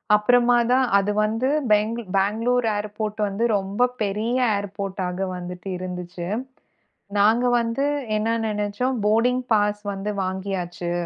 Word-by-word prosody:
அப்பறமா 245 Hz, +3 st, +4 dB, 0.2 s
தான் 260 Hz, 0 st, +4 dB
அது 200 Hz, +1 st, +1 dB
வந்து 225 Hz, +4 st, 0 dB, 0.2 s
பேங்கல் 215 Hz, +1 st, +1 dB
பேங்ளூர் 225 Hz, +5 st, +1 dB
ஏர்போட் 210 Hz, +1 st, -4 dB
வந்து 200 Hz, +3 st, -2 dB
ரொம்ப 200 Hz, +5 st, +1 dB
பெரிய 215 Hz, +4 st, 0 dB, 0.2 s
ஏர்போடாக 195 Hz, -2 st, -3 dB
வந்துட்டு 180 Hz, +1 st, -7 dB
இருந்துச்சு. 180 Hz, -1 st, -6 dB, 0.9 s
நாங்க 220 Hz, +4 st, +4 dB
வந்து 235 Hz, +4 st, -1 dB, 0.3 s
என்ன 220 Hz, +2 st, +1 dB
நெனச்சோம். 210 Hz, +4 st, -1 dB
போடிங் 245 Hz, +4 st, +2 dB
பாஸ் 210 Hz, 0 st, +1 dB
வந்து 195 Hz, +1 st, -4 dB
வாங்கியாச்சு. 185 Hz, -2 st, -3 dB
210 Hz, 115 wpm, -23 LUFS, 195-230 Hz, 0.9 s, அப்பறமா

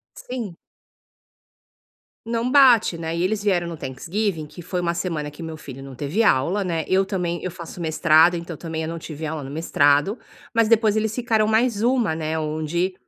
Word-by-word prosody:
Sim. 230 Hz, -9 st, -6 dB, 1.7 s
Não 230 Hz, +1 st, -1 dB
bate, 245 Hz, -10 st, +6 dB
né, 165 Hz, 0 st, -4 dB
e 170 Hz, -, 0 dB
eles 205 Hz, +1 st, 0 dB
vieram 180 Hz, -4 st, +1 dB
no 170 Hz, -1 st, -5 dB
Thanksgiving, 160 Hz, +6 st, -3 dB
que 175 Hz, +4 st, -11 dB
foi 180 Hz, +1 st, -3 dB
uma 170 Hz, -1 st, 0 dB
semana 165 Hz, -4 st, -3 dB
que 150 Hz, +3 st, -10 dB
meu 160 Hz, -1 st, -6 dB
filho 135 Hz, -3 st, -10 dB
não 135 Hz, -2 st, -10 dB
teve 150 Hz, -, 0 dB
aula, 180 Hz, +3 st, +2 dB
né, 165 Hz, -4 st, -1 dB
eu 190 Hz, +1 st, +3 dB
também 175 Hz, -3 st, -2 dB
eu 185 Hz, -, -3 dB
faço 175 Hz, 0 st, -9 dB
mestrado, 160 Hz, +1 st, +4 dB
então, 170 Hz, -1 st, -6 dB
também, 160 Hz, -1 st, -5 dB
eu 160 Hz, -, -4 dB
não 165 Hz, 0 st, -4 dB
tive 155 Hz, -1 st, -7 dB
aula 155 Hz, -1 st, -4 dB
no 135 Hz, -, -7 dB
mestrado, 145 Hz, -, +2 dB, 0.4 s
mas 230 Hz, -1 st, +3 dB
depois 220 Hz, -2 st, +4 dB
eles 220 Hz, 0 st, 0 dB
ficaram 220 Hz, -3 st, +1 dB
mais 220 Hz, -1 st, +2 dB
1, 240 Hz, -8 st, +2 dB
né, 160 Hz, 0 st, -2 dB
onde, 160 Hz, +4 st, -1 dB
170 Hz, 190 wpm, -23 LUFS, 160-210 Hz, 1.7 s, bate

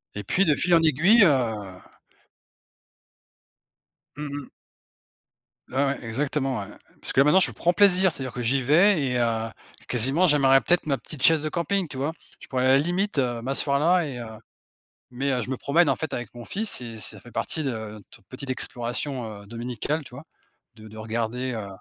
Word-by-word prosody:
Et 105 Hz, -, -4 dB
puis, 185 Hz, -, +2 dB
de 150 Hz, -, +4 dB
fil 175 Hz, +4 st, 0 dB
en 165 Hz, -, +6 dB
aiguille, 175 Hz, -, +5 dB
heu 110 Hz, -, 0 dB, 2.4 s
Mmh 150 Hz, -1 st, -5 dB, 0.2 s
mh. -, -, -22 dB, 1.2 s
Ouais, -, -, -9 dB
ouais 135 Hz, -2 st, -2 dB
exactement 135 Hz, +1 st, -2 dB
ouais, 100 Hz, -, -5 dB, 0.4 s
parce -, -, -3 dB
que -, -, +2 dB
là 135 Hz, -, +8 dB
maintenant 150 Hz, +6 st, +5 dB
je -, -, +2 dB
prends 175 Hz, -, +1 dB
plaisir, 190 Hz, -2 st, +5 dB
c'est-à-dire 130 Hz, -5 st, -6 dB
que 125 Hz, -, -5 dB
j'y 130 Hz, +3 st, +1 dB
vais 160 Hz, +6 st, +4 dB
et 125 Hz, -2 st, 0 dB
heu, 115 Hz, -1 st, 0 dB, 0.4 s
quasiment 135 Hz, +9 st, +2 dB
j'amènerais 135 Hz, -3 st, +5 dB
peut-être 175 Hz, -1 st, +2 dB
ma 140 Hz, -3 st, 0 dB
petite 145 Hz, -1 st, -7 dB
chaise 160 Hz, -2 st, +5 dB
de 155 Hz, -, -3 dB
camping, 180 Hz, +2 st, -1 dB
tu 135 Hz, -, -9 dB
vois? 140 Hz, +4 st, -1 dB, 0.3 s
Je -, -, -13 dB
pourrais 130 Hz, -1 st, -1 dB
à -, -, +3 dB
la -, -, +6 dB
limite, 175 Hz, +4 st, 0 dB
heu, 120 Hz, -3 st, -1 dB
m'asseoir 140 Hz, +2 st, 0 dB
là 175 Hz, +2 st, +3 dB
et 135 Hz, -4 st, -6 dB
heu, 120 Hz, -, -6 dB, 0.9 s
mais 135 Hz, +3 st, -2 dB
heu, 125 Hz, -, 0 dB
je 125 Hz, -, -6 dB
me 130 Hz, -, -2 dB
promène 165 Hz, +5 st, +2 dB
en -, -, +2 dB
fait 160 Hz, -3 st, -5 dB
avec 120 Hz, -2 st, -5 dB
mon 120 Hz, -1 st, -10 dB
fils 210 Hz, -, -1 dB
et 115 Hz, -2 st, -7 dB
ça 105 Hz, -1 st, -5 dB
fait 120 Hz, +5 st, -15 dB
partie 155 Hz, -, -1 dB
de 135 Hz, -, -1 dB
notre 110 Hz, -3 st, -9 dB
petite 130 Hz, +1 st, -8 dB
exploration, 120 Hz, -3 st, -3 dB
heu, -, -, -16 dB
dominicale, 120 Hz, +7 st, -3 dB
tu 130 Hz, -, -15 dB
vois? 140 Hz, -, -10 dB, 0.5 s
De 110 Hz, -1 st, -13 dB
de 110 Hz, -, -13 dB
regarder, 115 Hz, +3 st, -3 dB
heu 110 Hz, -3 st, -5 dB
135 Hz, 200 wpm, -25 LUFS, 120-155 Hz, 2.4 s, là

